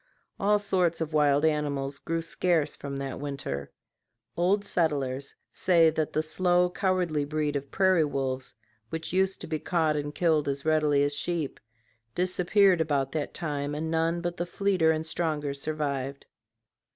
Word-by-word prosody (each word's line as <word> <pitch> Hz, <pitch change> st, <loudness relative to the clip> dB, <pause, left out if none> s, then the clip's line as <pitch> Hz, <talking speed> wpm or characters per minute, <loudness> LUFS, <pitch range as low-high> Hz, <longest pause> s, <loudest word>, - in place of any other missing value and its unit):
All 210 Hz, +1 st, +3 dB
sorts 185 Hz, -5 st, +1 dB
of 160 Hz, -1 st, -3 dB
wild 145 Hz, 0 st, +3 dB
animals 145 Hz, -3 st, -1 dB
grew 165 Hz, 0 st, -2 dB
scarce 165 Hz, -2 st, +1 dB
from 140 Hz, -1 st, -6 dB
that 135 Hz, -1 st, -4 dB
winter. 135 Hz, -, -4 dB, 0.7 s
Old 195 Hz, +4 st, +2 dB
settlers 140 Hz, -7 st, -1 dB, 0.2 s
say 170 Hz, -3 st, +4 dB
that 155 Hz, -1 st, -1 dB
the 155 Hz, -, 0 dB
slow 180 Hz, +2 st, +2 dB
cowardly 180 Hz, -6 st, 0 dB
breed 150 Hz, 0 st, -1 dB
of 140 Hz, 0 st, -3 dB
prairie 190 Hz, -4 st, +3 dB
wolves, 135 Hz, -4 st, -3 dB, 0.3 s
which 160 Hz, +1 st, -4 dB
used 190 Hz, +1 st, +1 dB
to -, -, -5 dB
be 155 Hz, -1 st, -2 dB
caught 160 Hz, -3 st, +1 dB
and 145 Hz, 0 st, -3 dB
killed 160 Hz, -4 st, +2 dB
as 140 Hz, 0 st, -2 dB
readily 150 Hz, -2 st, +3 dB
as 145 Hz, 0 st, 0 dB
sheep, 160 Hz, -1 st, -3 dB, 0.6 s
disappeared 185 Hz, 0 st, +3 dB
about 140 Hz, -4 st, 0 dB
that 150 Hz, -1 st, -3 dB
time 145 Hz, -2 st, -3 dB
and 160 Hz, +2 st, -3 dB
none 165 Hz, +1 st, +1 dB
but 175 Hz, 0 st, -3 dB
the 175 Hz, -, -2 dB
fleeter 185 Hz, -3 st, +2 dB
and 160 Hz, 0 st, +1 dB
stronger 155 Hz, -3 st, -1 dB
survived. 140 Hz, -2 st, -3 dB
155 Hz, 155 wpm, -28 LUFS, 145-175 Hz, 0.7 s, say